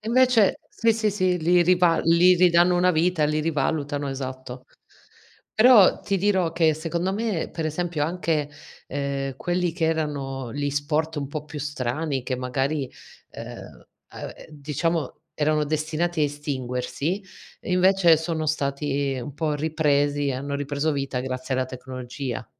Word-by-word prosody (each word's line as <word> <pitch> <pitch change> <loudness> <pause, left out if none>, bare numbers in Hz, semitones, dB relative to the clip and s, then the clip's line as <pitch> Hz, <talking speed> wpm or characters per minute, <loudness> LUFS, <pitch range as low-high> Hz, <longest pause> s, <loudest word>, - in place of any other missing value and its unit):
E 215 - -12
invece 250 -4 +4
sì, 230 -1 +2
sì, 215 -1 0
sì, 185 -2 +1
li 175 +2 +4
riva 175 -1 +3
li 170 +2 +5
ridanno 175 0 +4
una 180 +1 +4
vita, 165 -1 +2
li 150 +1 +1
rivalutano, 145 -2 -1
esatto. 130 -1 -6 0.9
Però 220 -4 +6
ti 200 - -1
dirò 190 -3 +2
che 160 -2 +3
secondo 170 +4 -2
me, 210 -5 -2
per 165 -1 -3
esempio, 165 0 -2
anche, 160 -3 -1 0.4
ehm, 140 -1 -3
quelli 175 0 -1
che 165 -1 -2
erano 140 -6 -2
li 145 +2 -2
sport 150 +3 -1
un 140 -2 -3
po' 150 +1 -5
più 150 -1 -8
strani, 140 0 -2
che 130 -1 -2
magari, 135 +2 -2 0.4
ehm, - - -10 0.3
uhm, - - -6
ehm, - - -13
diciamo 150 +1 -2 0.2
erano 150 0 +1
destinati 155 +3 -1
a - - +4
estinguersi, 145 +4 -3 0.4
invece 180 -2 +4
sono 160 0 -3
stati 140 -2 -1
un 140 - -8
po' 150 0 -1
ripresi, 145 -2 +1
hanno 140 +2 -3
ripreso 145 +2 -1
vita 140 -3 -2
grazie 130 +1 -3
alla 130 - +1
tecnologia. 130 -1 -6
155 Hz, 145 wpm, -24 LUFS, 140-175 Hz, 0.9 s, Però